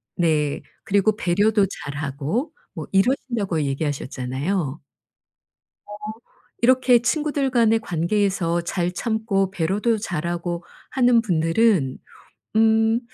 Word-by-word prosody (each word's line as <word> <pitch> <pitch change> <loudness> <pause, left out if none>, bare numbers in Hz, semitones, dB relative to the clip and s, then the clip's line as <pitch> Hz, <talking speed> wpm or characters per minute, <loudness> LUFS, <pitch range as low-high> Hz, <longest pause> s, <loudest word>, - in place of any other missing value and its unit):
네 155 -4 +1 0.2
그리고 200 +1 +2
배려도 205 +2 +2 0.2
잘하고 145 - -3 0.2
뭐 - - -6
이러신다고 200 - +1
얘기하셨잖아요. 140 +2 -2 1.1
어 205 - -9 0.7
이렇게 250 0 +5
친구들 290 +1 0
간의 230 -3 +3
관계에서 175 -2 0
잘 175 0 -2
참고 210 -1 -1
배려도 200 +6 0
잘하고 175 -3 -3 0.3
하는 245 -3 +4
분들은 165 - +2 0.6
음 225 +1 +4
195 Hz, 235 characters per minute, -22 LUFS, 165-225 Hz, 1.1 s, 이렇게